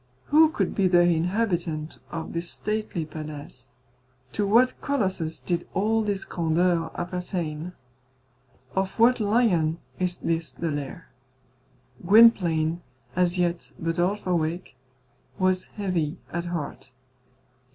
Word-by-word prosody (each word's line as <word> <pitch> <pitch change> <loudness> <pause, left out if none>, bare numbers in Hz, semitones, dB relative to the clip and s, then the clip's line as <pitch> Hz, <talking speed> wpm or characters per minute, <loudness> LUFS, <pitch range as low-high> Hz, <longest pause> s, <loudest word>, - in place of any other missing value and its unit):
Who 315 +1 +7
could 320 - -1
be 195 -2 +2
the 175 -1 +5
inhabitant 175 -2 0
of 165 -2 -5
this 170 +1 -3
stately 210 -6 -3
palace? 150 -5 -8 0.6
To 205 +5 0
what 240 +5 +4
colossus 190 - -1
did 175 -2 -2
all 220 +4 +2
this 205 -2 -1
grandeur 165 0 +1
appertain? 175 -2 -3 1.0
Of 190 0 -1
what 245 +2 +5
lion 205 -8 +2 0.2
is 180 -1 -1
this 165 0 -2
the 165 -2 -3
lair? 145 -2 -5 0.9
Gwynplaine, 175 -6 +5 0.3
as 180 0 +2
yet 175 -1 -1
but 165 0 -2
half 190 +4 0
awake, 170 -3 -1 0.6
was 185 0 +2
heavy 180 -5 -2 0.2
at 170 0 -2
heart. 170 -5 -5
175 Hz, 115 wpm, -26 LUFS, 165-200 Hz, 1.0 s, Who